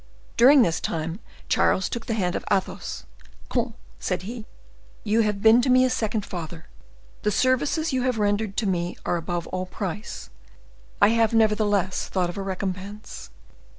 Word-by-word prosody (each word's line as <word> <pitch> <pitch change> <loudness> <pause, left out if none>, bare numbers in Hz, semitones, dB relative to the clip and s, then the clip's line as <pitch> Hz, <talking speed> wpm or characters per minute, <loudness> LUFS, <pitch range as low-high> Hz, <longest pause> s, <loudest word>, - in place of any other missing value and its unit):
During 265 +2 +7
this 165 -6 0
time, 165 +3 -3 0.3
Charles 190 - +2
took 235 - -5
the 225 - 0
hand 180 -4 0
of - - -3
Athos. 190 -2 -2 0.4
"Comte," - - -1 0.2
said 65 - -2
he, 225 +2 -7 0.6
"you 220 +1 +2
have 210 -2 -1
been 225 +2 +7
to 255 - 0
me 255 0 +6
a 255 - +1
second 220 -4 -1
father; 170 -1 -7 0.6
the 210 - +1
services 265 +7 +1
you 260 - +1
have 250 -2 0
rendered 205 -1 0
to 225 - +1
me 175 -2 -1
are 175 - +1
above 170 +1 -3
all 185 0 -3
price. 200 +2 -6 0.7
I 205 - +8
have, 230 0 +2
nevertheless, 210 -4 +2
thought 180 -2 0
of - - -11
a - - -2
recompense. 195 +2 -5
205 Hz, 165 wpm, -25 LUFS, 185-230 Hz, 0.7 s, I